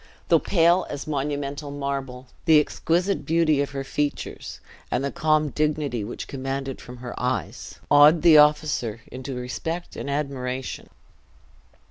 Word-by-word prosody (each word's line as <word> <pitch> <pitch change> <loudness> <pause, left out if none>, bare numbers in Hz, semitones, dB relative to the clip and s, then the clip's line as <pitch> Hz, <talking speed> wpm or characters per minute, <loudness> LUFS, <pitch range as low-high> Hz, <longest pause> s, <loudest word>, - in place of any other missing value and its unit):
Though - - +6
pale 175 0 +3
as 145 -1 -5
monumental 145 0 -3
marble, 135 -3 -4 0.2
the 160 -3 +7
exquisite 175 +5 0
beauty 160 -3 +2
of 140 - -2
her 135 -1 -4
features, 145 +1 -4 0.3
and 130 - -1
the 140 - -1
calm 155 -1 +1
dignity 150 -5 -1
which 110 - -6
commanded 135 0 -4
from 125 0 -10
her 120 0 -7
eyes, 125 - -3
awed 150 +3 +7
the 160 -3 +8
officer 150 -7 +2
into 130 +1 -6
respect 160 +8 -5
and - - -5
admiration. 135 -3 -3
140 Hz, 135 wpm, -24 LUFS, 130-155 Hz, 0.3 s, the